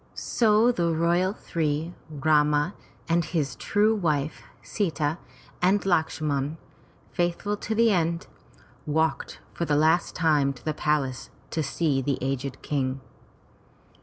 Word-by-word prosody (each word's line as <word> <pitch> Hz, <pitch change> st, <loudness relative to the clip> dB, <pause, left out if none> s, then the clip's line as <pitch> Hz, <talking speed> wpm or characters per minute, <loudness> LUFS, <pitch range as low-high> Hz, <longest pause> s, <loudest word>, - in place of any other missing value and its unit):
So 225 Hz, +1 st, +3 dB
the 170 Hz, -7 st, 0 dB
royal 170 Hz, +3 st, +2 dB
three, 160 Hz, -3 st, -2 dB, 0.2 s
Rama, 150 Hz, +2 st, +2 dB, 0.3 s
and 170 Hz, 0 st, +2 dB
his 150 Hz, -6 st, -2 dB
true 210 Hz, -, +2 dB
wife, 155 Hz, -7 st, -1 dB, 0.2 s
Sita, 160 Hz, -5 st, -1 dB, 0.4 s
and 190 Hz, +3 st, +4 dB
Lakshman, 155 Hz, -4 st, 0 dB, 0.5 s
faithful 175 Hz, +4 st, -1 dB
to 220 Hz, +2 st, -3 dB
the 230 Hz, 0 st, +4 dB
end, 170 Hz, -2 st, 0 dB, 0.6 s
walked 160 Hz, +2 st, -1 dB
for 170 Hz, -, -2 dB
the 150 Hz, -, +1 dB
last 160 Hz, +3 st, +2 dB
time 150 Hz, -4 st, +2 dB
to 125 Hz, -, -17 dB
the 155 Hz, -, 0 dB
palace, 140 Hz, -4 st, -1 dB, 0.2 s
to 160 Hz, -, -1 dB
see 145 Hz, -1 st, 0 dB
the 135 Hz, 0 st, -1 dB
aged 135 Hz, 0 st, -3 dB
King. 135 Hz, -2 st, -1 dB
160 Hz, 125 wpm, -26 LUFS, 145-175 Hz, 0.6 s, and